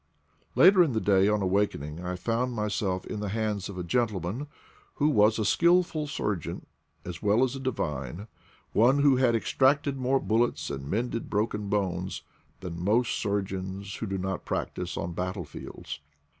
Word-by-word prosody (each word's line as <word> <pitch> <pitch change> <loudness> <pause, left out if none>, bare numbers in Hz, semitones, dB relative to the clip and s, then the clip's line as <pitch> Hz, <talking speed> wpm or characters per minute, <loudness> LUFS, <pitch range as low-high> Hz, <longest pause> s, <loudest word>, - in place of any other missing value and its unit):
Later 185 +1 +7
in 150 -7 0
the 110 - +1
day, 100 -2 +4
on 105 -1 +2
awakening, 90 -5 -1
I 90 0 -3
found 120 +6 -1
myself 100 -3 -1
in 105 - -5
the 105 -1 -3
hands 105 -2 -2
of 95 - -7
a 90 - -3
gentleman 105 - -1 0.5
who 150 +1 +2
was 105 -5 +4
a 110 - 0
skillful 170 - +3
surgeon 105 - -3 0.4
as 85 -1 -6
well 105 +4 +3
as 130 0 0
a - - -5
divine, 85 - -3 0.5
one 130 +6 +4
who 140 -3 +5
had 125 -2 +3
extracted 135 +7 +2
more 130 +1 +2
bullets 110 - 0
and 70 0 -5
mended 115 +3 -2
broken 105 -1 -1
bones 95 -3 -1 0.4
than 85 -2 -5
most 115 +5 +2
sur 100 -1 0
geons 95 +1 -6
who 110 - -3
do 95 0 -2
not 95 0 -3
practise - - -3
on 85 0 -3
battle 90 +1 -3
fields. 75 - -8
105 Hz, 170 wpm, -28 LUFS, 95-125 Hz, 0.5 s, Later